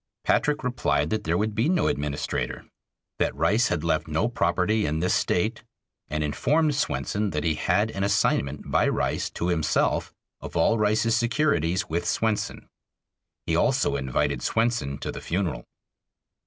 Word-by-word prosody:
Patrick 150 -1 +1
replied 75 - 0
that 110 -1 -1
there 85 +1 +1
would 105 +2 0
be 115 +8 +1
no 175 -3 +2
administrator; 70 0 -2 0.5
that - - 0
Rice 100 - +2
had 80 -3 -1
left 80 -1 0
no 80 +7 0
property 105 0 +1
in 75 +2 -1
this 90 +3 +1
State, 110 +7 0 0.4
and 75 +1 -2
informed 150 - +1
Swenson 105 -7 -1
that 75 -3 -2
he 80 - +2
had 105 +7 +1
an 95 - -3
assignment 85 -8 0
by - - +3
Rice - - -1
to 85 - -3
himself 80 -3 +1 0.3
of - - -6
all 115 - +3
Rice's 110 +2 +2
securities 115 - +1
with 85 +2 -2
Swenson. 110 -2 -1 0.8
He - - 0
also - - +2
invited 65 -3 -1
Swenson 115 - 0
to - - -4
the - - -8
funeral. 85 -6 -2
95 Hz, 155 wpm, -25 LUFS, 80-115 Hz, 0.8 s, by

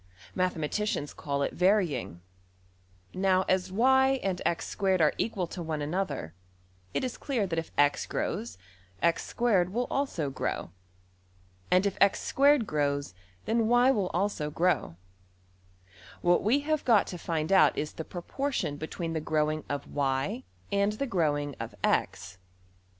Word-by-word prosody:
Mathematicians 180 0 -1
call 140 -1 -2
it - - -3
\emph{varying}. 180 - +1 0.9
Now 185 0 +2
as 185 0 +1
$y$~and~$x^2$ 200 -6 +2
are 155 -2 +4
equal 200 -5 -1
to 175 +1 -7
one 160 -2 -3
another, 150 - -3 0.6
it - - -1
is 255 -2 -4
clear 250 -8 -1
that 165 -3 -1
if 165 - -7
$x$~grows, 145 - 0 0.5
$x^2$~will 200 +4 +1
also 175 - -1
grow. 130 - -3 1.0
And 185 +2 +4
if 200 - -1
$x^2$~grows, 195 - +2 0.3
then 225 +1 +1
$y$~will 245 -5 +3
also 175 -4 -1
grow. 165 - 0 1.3
What 175 0 +3
we 245 +8 +2
have 310 +1 -1
got 225 -5 +4
to 180 - -7
find 160 +1 -2
out 190 - +5
is 150 +1 -3
the 160 - -5
proportion 180 - -3
between 165 +2 -4
the 160 - -2
growing 155 0 0
of~$y$ 145 - -2 0.3
and 200 +1 +2
the 245 +6 -2
growing 145 - 0
of~$x$. 95 -4 -2
180 Hz, 120 wpm, -29 LUFS, 150-215 Hz, 1.3 s, out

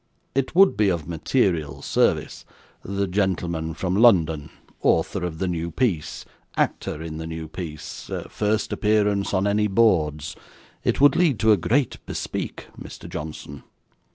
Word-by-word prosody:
It 135 +4 -1
would 195 +1 +6
be 105 -1 +3
of 85 -5 -2
material 85 - 0
service - - +1 0.4
the 100 +1 -2
gentleman 90 -4 -1
from 90 +2 -1
London 80 -10 +4 0.3
author 90 +3 +1
of 85 -2 -3
the 95 - -1
new 85 -1 -2
piece 85 -6 -1 0.3
actor 80 - -1
in 80 -1 -6
the 80 0 -5
new 80 -1 -6
piece 80 -2 -7 0.2
first 105 +1 -1
appearance 105 -2 +1
on 95 0 +1
any 105 +1 +2
boards 80 -8 +2 0.5
it - - +1
would 145 - +7
lead 165 -8 +3
to 110 - +5
a - - +7
great 125 - 0
bespeak, - - -4 0.2
Mr. - - -9
Johnson. 75 -2 -7
90 Hz, 145 wpm, -24 LUFS, 80-105 Hz, 0.5 s, would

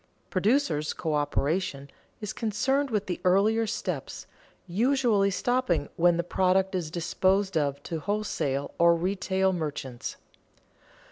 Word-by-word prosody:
Producers' 185 - +1
coöperation 150 -1 -1 0.3
is 210 0 -4
concerned 265 +6 0
with 210 -3 -1
the 180 - -4
earlier 210 +5 +3
steps, 220 - -4 0.4
usually 220 +1 +2
stopping 215 - 0
when 175 0 +4
the 170 - 0
product 190 +2 +1
is 175 -4 -2
disposed 190 +3 +1
of 145 -2 0
to 165 - -4
wholesale 155 -8 -2
or 170 0 +6
retail 190 +2 0
merchants. 145 -7 -4
185 Hz, 115 wpm, -27 LUFS, 160-210 Hz, 0.4 s, or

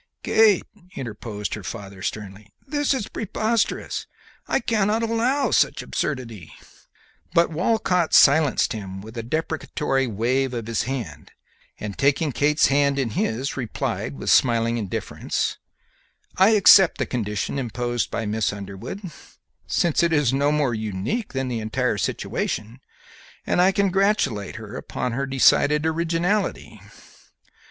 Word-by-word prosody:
"Kate," 220 -4 +4 0.3
interposed 105 -4 -5
her 105 - -5
father, 100 -1 -8
sternly, 105 0 -6
"this 290 +1 0
is 255 -7 -1
preposterous! 220 +1 -2 0.4
I - - +1
cannot 220 -1 0
allow 235 +5 +1
such - - +2
absurdity;" 115 - -4 0.8
but 170 0 +4
Walcott 180 -1 +1
silenced 145 -1 +5
him 95 -3 -7
with 110 +3 -11
a 115 - -3
deprecatory 150 0 -1
wave 125 +4 0
of 115 -2 -4
his 115 -1 -1
hand, 95 - -5 0.5
and, 105 -2 -5
taking 140 +2 +1
Kate's 150 +4 +2
hand 140 0 +2
in 130 -5 -1
his, 120 +5 -2
replied, 105 - -3
with 65 - -1
smiling 115 -1 +3
indifference, 100 -4 -3 0.8
"I 190 +3 +5
accept 195 -2 +7
the - - -1
condition 105 +2 -3
imposed 120 -1 -2
by 115 - -3
Miss 110 +1 0
Underwood, 100 - -7 0.7
since 170 -2 +1
it 170 -1 +2
is 145 -5 +2
no 140 +2 +2
more 150 -5 +1
unique 110 - -3
than 130 -1 -2
the 120 -2 -2
entire 110 0 -1
situation, 110 +6 -3 0.7
and - - +2
I 185 +2 +5
congratulate 195 - +1
her 110 +3 -8
upon 125 - -4
her 135 +4 -2
decided 145 +3 +3
originality. 170 - -1
130 Hz, 130 wpm, -23 LUFS, 110-170 Hz, 0.8 s, accept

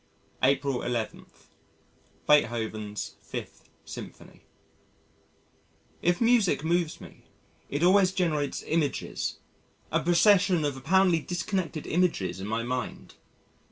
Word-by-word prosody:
April 135 0 +2
11. 120 -3 -3 1.0
Beethoven's 110 -7 0
Fifth - - -8 0.2
Symphony - - -10 1.6
If 175 0 +2
music 225 - +3
moves 170 0 0
me, - - -14 0.4
it 145 +4 -2
always 185 +1 +5
generates 155 -7 -1
images 155 -3 -1 0.5
a 165 - +2
procession 180 0 +4
of 145 -2 -1
apparently 175 +5 +3
disconnected 175 -1 -3
images 105 - 0
in 100 - -5
my 110 +2 -1
mind. 125 0 -4
155 Hz, 95 wpm, -27 LUFS, 125-180 Hz, 1.6 s, always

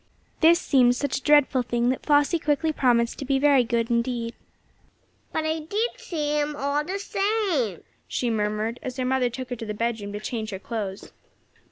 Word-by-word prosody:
This 335 +1 +6
seemed 250 -7 +4
such 280 +1 -1
a - - -21
dreadful 290 -3 +4
thing, 240 0 0
that 255 - -1
Flossie 290 +3 +3
quickly 305 +1 0
promised 240 -4 +2
to - - -3
be 270 0 +2
very 280 -2 +4
careful 235 0 0
indeed. 235 -1 -2 1.0
"But 315 - -1
I 315 +1 0
did 410 +10 -1
see 300 -3 -2
him, 295 0 -1
all 285 +1 0
the 370 +6 -3
same!" 390 - -1 0.2
she 245 -2 -1
murmured, 215 +2 -1
as 255 0 -6
her 255 - -1
mother 255 -1 +1
took 255 +1 -7
her - - -1
to 225 - -7
the 210 - -4
bedroom 220 -2 -2
to 205 - -4
change 220 0 -4
her 195 - -4
clothes. 200 -2 -5
255 Hz, 190 wpm, -25 LUFS, 235-295 Hz, 1.0 s, This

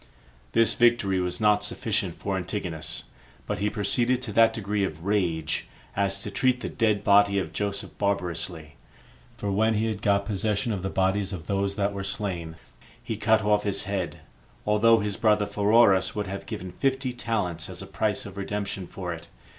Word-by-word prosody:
This 115 - +4
victory 115 -6 +3
was 90 -1 -1
not 105 -1 +3
sufficient 105 -4 -1
for 100 -1 -2
Antigonus; 90 -3 -3 0.4
but 105 -2 -3
he 105 +1 +1
proceeded 115 +4 +1
to 110 - -4
that 115 +1 +6
degree 105 -2 -1
of 80 -2 -4
rage, 85 -6 0 0.3
as 100 0 0
to - - -5
treat 125 -1 +1
the - - -3
dead 110 -3 +1
body 100 -1 +5
of 95 - -2
Joseph 100 -1 -2
barbarously; 85 -6 -2 0.6
for 100 - -2
when 110 +3 +2
he 110 +2 +1
had 110 -2 -2
got 100 -1 +2
possession 105 +2 -1
of 100 - -3
the 95 - -2
bodies 95 +1 0
of 85 -3 -6
those 100 0 -1
that 100 0 0
were 100 0 -4
slain, 90 -5 -3 0.5
he 115 -2 -3
cut 110 +1 +3
off 105 0 +3
his 100 -1 -1
head, 95 -3 -3 0.4
although 110 +2 +4
his 105 -2 -2
brother 105 -2 +3
Pheroras 105 -2 +4
would 105 -1 -1
have 100 +1 -6
given 90 0 -5
fifty 130 +4 -1
talents 110 -8 -2
as - - -5
a - - -8
price 105 -2 -1
of 100 -1 -9
redemption 100 -2 -3
for 90 -2 -5
it. 80 - -9
100 Hz, 180 wpm, -26 LUFS, 95-105 Hz, 0.6 s, that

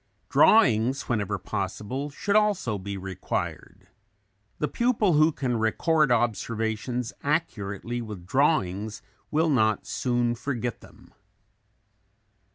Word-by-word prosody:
Drawings, 130 - +4
whenever 105 -4 -1
possible, 105 +8 -4
should 200 +8 -2
also 205 - +2
be 100 +1 -5
required. 95 -1 -5 0.7
The 150 - 0
pupil 230 -5 +1
who 155 +2 +5
can 125 -5 -2
record 150 +7 +2
observations 115 +1 -1
accurately 120 - -2
with 105 -6 -8
drawings 110 - 0 0.3
will 160 +1 +2
not 110 -5 +2
soon 120 -1 0
forget 120 -2 -4
them. - - -18
120 Hz, 100 wpm, -26 LUFS, 105-150 Hz, 0.7 s, who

